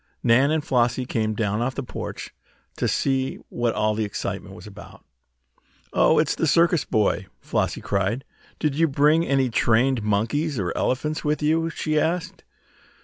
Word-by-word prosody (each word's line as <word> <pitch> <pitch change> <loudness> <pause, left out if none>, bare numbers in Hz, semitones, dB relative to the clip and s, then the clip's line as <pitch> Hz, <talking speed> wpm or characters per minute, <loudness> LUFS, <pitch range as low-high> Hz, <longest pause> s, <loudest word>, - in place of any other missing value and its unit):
Nan 125 +4 +4
and 155 -1 0
Flossie 120 0 +1
came 110 -3 -1
down 105 0 -1
off 130 +2 -1
the 140 - -3
porch - - -7 0.4
to - - 0
see 135 -1 0
what 120 -1 -1
all 110 0 +1
the 110 +1 -1
excitement 100 - -5
was - - -12
about. - - -13 0.9
"Oh, - - +4
it's - - +2
the 165 - -1
circus 170 0 +3
boy!" 105 -2 0
Flossie - - -2
cried. 100 +6 -1 0.3
"Did 150 -2 0
you 165 +3 +2
bring 150 +3 +3
any 135 -5 +1
trained 120 +2 +2
monkeys 115 +9 0
or 95 -4 -2
elephants 150 +4 -1
with 150 0 -1
you?" 165 +2 +2
she 155 -2 -1
asked. 175 +4 -2
130 Hz, 160 wpm, -24 LUFS, 110-155 Hz, 0.9 s, Nan